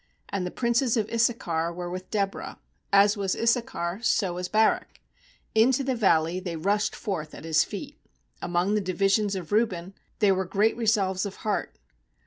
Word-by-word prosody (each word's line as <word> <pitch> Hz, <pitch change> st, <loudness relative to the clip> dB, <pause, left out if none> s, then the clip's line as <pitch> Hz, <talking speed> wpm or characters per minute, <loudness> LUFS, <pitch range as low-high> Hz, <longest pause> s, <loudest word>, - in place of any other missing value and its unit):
15And 190 Hz, -2 st, -1 dB
the -, -, -2 dB
princes 235 Hz, +3 st, +1 dB
of 215 Hz, -1 st, -1 dB
Issachar 180 Hz, -8 st, 0 dB
were 175 Hz, +1 st, -6 dB
with 185 Hz, +1 st, -6 dB
Deborah; 200 Hz, -2 st, -2 dB, 0.3 s
As 200 Hz, +1 st, +5 dB
was 195 Hz, -2 st, -1 dB
Issachar, 225 Hz, -6 st, 0 dB
so 195 Hz, -6 st, +1 dB
was 180 Hz, +1 st, -4 dB
Barak; 220 Hz, +1 st, +1 dB, 0.5 s
Into 245 Hz, +5 st, +4 dB
the 260 Hz, 0 st, 0 dB
valley 180 Hz, -6 st, +2 dB
they 180 Hz, -3 st, -5 dB
rushed 200 Hz, +6 st, 0 dB
forth 180 Hz, -8 st, -4 dB
at -, -, -10 dB
his 160 Hz, -1 st, +3 dB
feet. 275 Hz, +8 st, -8 dB, 0.4 s
Among 175 Hz, +3 st, 0 dB
the 210 Hz, -, +2 dB
divisions 195 Hz, +2 st, +1 dB
of 180 Hz, -2 st, -6 dB
Reuben 195 Hz, -4 st, 0 dB, 0.2 s
There 205 Hz, -4 st, +4 dB
were 190 Hz, 0 st, -1 dB
great 205 Hz, +5 st, +1 dB
resolves 205 Hz, -4 st, +1 dB
of 195 Hz, -, -9 dB
heart. 210 Hz, -2 st, -2 dB
200 Hz, 165 wpm, -26 LUFS, 180-220 Hz, 0.5 s, As